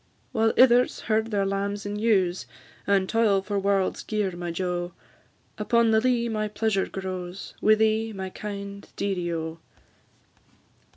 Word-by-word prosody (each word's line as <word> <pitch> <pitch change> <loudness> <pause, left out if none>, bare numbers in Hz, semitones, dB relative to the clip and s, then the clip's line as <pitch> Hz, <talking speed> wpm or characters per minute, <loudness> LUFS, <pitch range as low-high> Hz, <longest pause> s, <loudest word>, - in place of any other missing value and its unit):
While 225 0 +2
ithers 250 -1 +5
herd 220 0 0
their 200 -3 0
lambs 200 +1 -2
and 205 +1 -4
ewes, 190 -5 +2 0.4
And 195 -1 +3
toil 210 -4 +2
for 205 0 -1
warld's 195 -1 +1
gear, 210 -3 -1
my 175 0 -5
jo, 175 0 -2 0.7
Upon 230 +1 +3
the 220 0 +4
lea 240 -1 +2
my 215 -2 -1
pleasure 210 -2 0
grows, 185 -1 -6
Wi' 215 - +6
thee, 220 +1 +1
my 190 -2 -6
kind 200 -1 -7
dearie, 180 -4 -2
O! 160 0 -4
200 Hz, 140 wpm, -26 LUFS, 190-220 Hz, 0.7 s, Wi